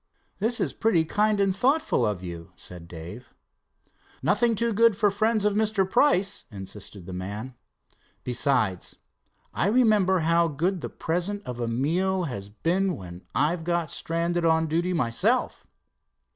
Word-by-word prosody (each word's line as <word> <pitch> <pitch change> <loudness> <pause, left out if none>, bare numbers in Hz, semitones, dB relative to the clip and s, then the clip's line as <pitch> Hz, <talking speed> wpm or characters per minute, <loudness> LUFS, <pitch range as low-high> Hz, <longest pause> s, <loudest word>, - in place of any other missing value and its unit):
"This 225 +4 0
is - - -1
pretty 175 -8 +2
kind 210 +4 +1
and 195 -1 +2
thoughtful 285 - +2
of 100 -4 -3
you," 85 -2 -8
said 85 -2 -11
Dave. 90 +9 -10 0.9
"Nothing 235 -2 +2
too 230 +2 0
good 230 -1 +4
for 205 -2 +3
friends 215 +1 +1
of 210 - +3
Mr. 210 -2 +1
Price," 195 -4 +2
insisted 95 -1 -9
the 95 - -7
man. 100 +7 -5 0.7
"Besides, 125 -7 0 0.6
I - - 0
remember 210 -6 +3
how 170 +1 +3
good 170 +5 -1
the - - -4
present 180 +5 -3
of 125 -1 -6
a 120 - -1
meal 175 +10 0
has 100 - -5
been 175 - 0
when 90 -2 -10
I've 165 +3 +1
got 170 -2 -1
stranded 170 +1 -1
on 160 0 +3
duty 170 +3 0
myself." 120 -10 0
170 Hz, 145 wpm, -26 LUFS, -, 0.9 s, good